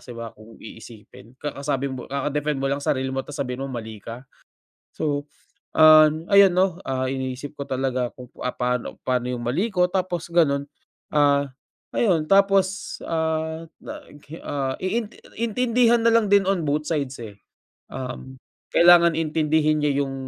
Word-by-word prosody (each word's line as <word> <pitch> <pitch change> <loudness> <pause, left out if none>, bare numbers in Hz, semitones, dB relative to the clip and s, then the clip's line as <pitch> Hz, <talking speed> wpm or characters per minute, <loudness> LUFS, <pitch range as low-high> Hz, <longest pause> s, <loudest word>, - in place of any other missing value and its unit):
ba - - -20
siba 115 -2 -8
kung 110 +1 -15
iisipin. 110 +1 -13
Kakasabi 140 -2 -3
mo 125 -2 -6
kaka-defend 145 +1 -2
mo 135 - 0
lang 140 +1 -1
sarili 130 -1 0
mo 135 0 -3
tapos 145 0 -7
sabihin 125 0 -3
mo - - -5
mali 110 -3 -6
ka. 115 +5 -9 0.7
So, 145 -2 -2 0.5
ah, 155 0 +8 0.2
ayan 200 -1 +7
'no, 185 -2 +2
ah, 130 -1 -2
iniisip 130 +2 -5
ko 140 - -5
talaga 130 -2 -1
kung, 125 -1 -11 0.2
ah, 125 - -1
paano 125 -1 -3
paano 125 -1 0
yung 120 -1 -4
mali 185 - 0
ko 180 -1 +2
tapos 180 -3 -2
ganun. 140 -4 +2 0.4
Ah, 140 -2 +2 0.4
ayun, 175 -9 +2
tapos, 195 -1 +2
ah, 160 0 -2 0.2
nag 145 - -10
hi 160 - -8
ah, 135 -2 -2
iin 210 +3 -1 0.3
intindihan 235 +1 +2
nalang 230 -2 +4
din 200 -2 +5
on 195 -3 +1
both 150 +1 -1
sides, 140 -5 -2
eh. 105 -2 -9 0.6
Um, 130 0 -7 0.4
kailangan 170 -1 +6
intindihin 155 -1 +1
niya 145 -1 +1
yung 135 -1 -6
145 Hz, 155 wpm, -23 LUFS, 130-170 Hz, 0.7 s, ah